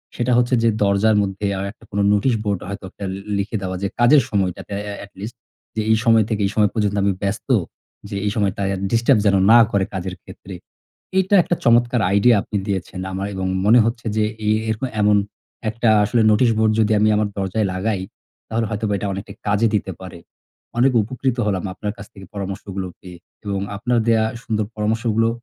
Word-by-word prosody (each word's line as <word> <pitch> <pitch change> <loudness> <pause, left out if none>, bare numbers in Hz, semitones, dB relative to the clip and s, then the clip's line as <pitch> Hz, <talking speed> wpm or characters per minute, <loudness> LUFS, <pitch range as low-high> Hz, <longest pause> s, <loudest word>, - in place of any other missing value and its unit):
সেটা 120 0 0
হচ্ছে 125 +1 +2
যে, - - +4
দরজার 100 +2 +3
মধ্যে 100 +1 -4
আ - - -3
একটা 120 - -23
কোনো 100 0 0
নোটিশ 105 +5 +2
বোর্ড 100 -4 -1
হয়তো 100 0 -6
একটা 100 - -8
লি 95 - -6 0.2
লিখে 100 +3 -3
দেওয়া 95 -1 -3
যে, - - +1
কাজের 135 +4 +6
সময়টাতে 100 -2 -2 0.2
এ - - -4
এটলিস্ট 100 +3 -9 0.4
যে, 110 - 0
"এই 110 - +4
সময় 115 -2 +5
থেকে 110 -2 -1
এই - - -5
সময় 105 -2 +3
পর্যন্ত 105 -2 0
আমি 100 0 +2
ব্যস্ত, 100 +7 -3 0.6
যে 100 - -5
এই 105 - +1
সময় 100 -3 +1
তায়া 100 -1 -1 0.2
ডিস্টার্ব 115 +1 +3
যেন 100 -1 +4 0.2
না 120 - +9
করে 100 -2 +1
কাজের 95 -1 -4
ক্ষেত্রে।" 95 -1 -11 0.7
এটা 190 +2 0
একটা 175 - 0
চমৎকার 120 +1 +3
আইডিয়া 105 +3 +5
আপনি 105 - -5
দিয়েছেন 95 -2 -3
আমার 95 +1 -3
এবং 95 0 -2 0.2
মনে 110 +4 +6
হচ্ছে 115 0 -3
যে 110 - +2 0.2
এ - - +4 0.2
এরকম 110 +4 -1
এমন 105 0 +4 0.5
একটা 115 +1 0 0.2
আসলে 115 +2 +2
নোটিশ 115 +3 +4
বোর্ড 110 -1 +3
যদি 110 0 +2
আমি 110 - +4
আমার 105 0 +1
দরজায় 100 +2 -1
লাগাই, 95 +1 -1 0.5
তাহলে 115 +1 -1
হয়তোবা 110 -1 -2
এটা 105 - -3
অনেকটা 95 +2 -6
কাজে 105 +2 +2
দিতে 95 -2 -1
পারে। 90 -2 -9 0.6
অনেক 130 +2 +4
উপকৃত 130 +3 -2
হলাম 95 -3 -1
আপনার 105 +2 -4
কাছ 100 - -9
থেকে 95 -1 -12
পরামর্শগুলো 95 -1 -5
পেয়ে 90 -2 -12 0.3
এবং 100 -1 -2 0.2
আপনার 120 +3 0
দেয়া 110 -1 +4 0.2
সুন্দর 110 -2 -1
পরামর্শগুলো 115 +1 +1
105 Hz, 195 wpm, -20 LUFS, 100-115 Hz, 0.7 s, না